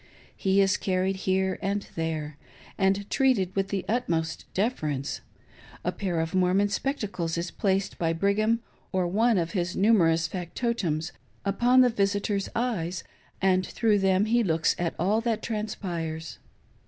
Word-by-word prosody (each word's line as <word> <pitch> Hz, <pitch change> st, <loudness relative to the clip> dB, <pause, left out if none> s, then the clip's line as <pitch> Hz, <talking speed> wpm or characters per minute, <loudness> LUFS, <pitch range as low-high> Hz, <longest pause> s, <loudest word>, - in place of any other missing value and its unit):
He 195 Hz, +1 st, +2 dB
is 195 Hz, -1 st, +3 dB
carried 190 Hz, 0 st, 0 dB
here 190 Hz, 0 st, 0 dB
and 200 Hz, +1 st, -2 dB
there, 155 Hz, -2 st, -3 dB, 0.4 s
and 195 Hz, +1 st, +1 dB
treated 230 Hz, -9 st, +2 dB
with 195 Hz, -1 st, +1 dB
the 195 Hz, -1 st, -3 dB
utmost 170 Hz, -9 st, -1 dB
deference; 155 Hz, -, -1 dB, 0.6 s
a -, -, +1 dB
pair 180 Hz, -4 st, -2 dB
of 160 Hz, 0 st, -2 dB
Mor 185 Hz, 0 st, +3 dB
mon 205 Hz, +1 st, +3 dB
spectacles 200 Hz, -, -2 dB
is 170 Hz, +1 st, -3 dB
placed 195 Hz, -1 st, -1 dB
by 165 Hz, -1 st, +1 dB
Brigham, 210 Hz, +6 st, +1 dB, 0.3 s
or 185 Hz, -1 st, +1 dB
one 220 Hz, +4 st, +3 dB
of 170 Hz, -2 st, 0 dB
his 185 Hz, -2 st, -2 dB
numerous 170 Hz, -6 st, +4 dB
factotums, 175 Hz, -2 st, -2 dB, 0.3 s
upon 240 Hz, +6 st, +4 dB
the 250 Hz, -, +5 dB
visitor's 200 Hz, -1 st, 0 dB
eyes, 185 Hz, -8 st, -1 dB, 0.4 s
and 185 Hz, -1 st, +4 dB
through 210 Hz, +2 st, +1 dB
them 190 Hz, +1 st, +3 dB
he 235 Hz, +2 st, +2 dB
looks 165 Hz, -4 st, +2 dB
at 175 Hz, -1 st, -1 dB
all 205 Hz, +6 st, +2 dB
that 230 Hz, -2 st, -1 dB
transpires. 175 Hz, -7 st, -4 dB
190 Hz, 145 wpm, -27 LUFS, 170-210 Hz, 0.6 s, the